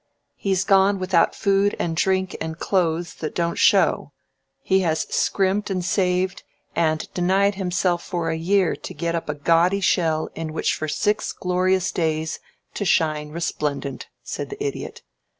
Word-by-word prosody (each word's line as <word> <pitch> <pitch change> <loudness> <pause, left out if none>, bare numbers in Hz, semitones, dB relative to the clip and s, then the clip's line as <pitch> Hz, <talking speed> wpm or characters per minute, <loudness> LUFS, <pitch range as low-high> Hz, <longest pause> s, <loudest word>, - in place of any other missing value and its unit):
"He's 190 -2 0
gone 195 0 +4
without 185 -3 +2
food 200 +1 +2
and 165 -1 -2
drink 190 +2 +1
and 160 0 -4
clothes 170 -2 0
that 155 - -5
don't 170 -1 -1
show. 190 -7 +3 0.5
He 190 0 +3
has 160 -4 +1
scrimped 200 +2 +1
and 185 -2 -2
saved, 185 0 0 0.3
and 155 -2 +1
denied 190 +3 +2
himself 180 -2 0
for 170 -3 -2
a - - -1
year 185 +3 +2
to - - -8
get 170 -1 -2
up 165 -2 -3
a 150 - -1
gaudy 170 +6 +3
shell 160 -3 +1
in 160 -1 -5
which - - 0
for 155 - -3
six 210 +7 0
glorious 185 0 0
days 160 -1 -1 0.3
to - - -3
shine 155 -5 +1
resplendent," 150 -4 -3 0.2
said - - -5
the 415 0 -5
Idiot. 420 - -5
180 Hz, 155 wpm, -23 LUFS, 160-190 Hz, 0.5 s, gone